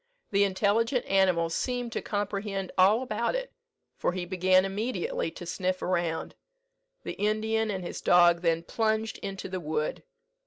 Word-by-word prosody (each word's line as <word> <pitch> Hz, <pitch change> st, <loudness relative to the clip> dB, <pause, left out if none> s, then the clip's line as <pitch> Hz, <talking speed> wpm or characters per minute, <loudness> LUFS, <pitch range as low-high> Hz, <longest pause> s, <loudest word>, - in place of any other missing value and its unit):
The 200 Hz, 0 st, +4 dB
intelligent 210 Hz, +6 st, +1 dB
animal 185 Hz, -4 st, +2 dB
seemed 245 Hz, +5 st, -2 dB
to -, -, -3 dB
comprehend 200 Hz, -1 st, -3 dB
all 205 Hz, +6 st, +5 dB
about 235 Hz, -, -1 dB
it, -, -, -4 dB, 0.5 s
for -, -, 0 dB
he 180 Hz, -1 st, -3 dB
began 185 Hz, +1 st, +3 dB
immediately 255 Hz, -, -2 dB
to 185 Hz, -, -9 dB
sniff 185 Hz, +1 st, -2 dB
around. 170 Hz, -3 st, -1 dB, 0.7 s
The -, -, -4 dB
Indian 220 Hz, +1 st, 0 dB
and 190 Hz, -3 st, -3 dB
his 175 Hz, -, -6 dB
dog 175 Hz, -1 st, +5 dB
then 165 Hz, -1 st, +1 dB
plunged 220 Hz, +3 st, -1 dB
into 195 Hz, -1 st, -5 dB
the 185 Hz, 0 st, -4 dB
wood. 155 Hz, -2 st, -2 dB
195 Hz, 150 wpm, -28 LUFS, 180-220 Hz, 0.7 s, all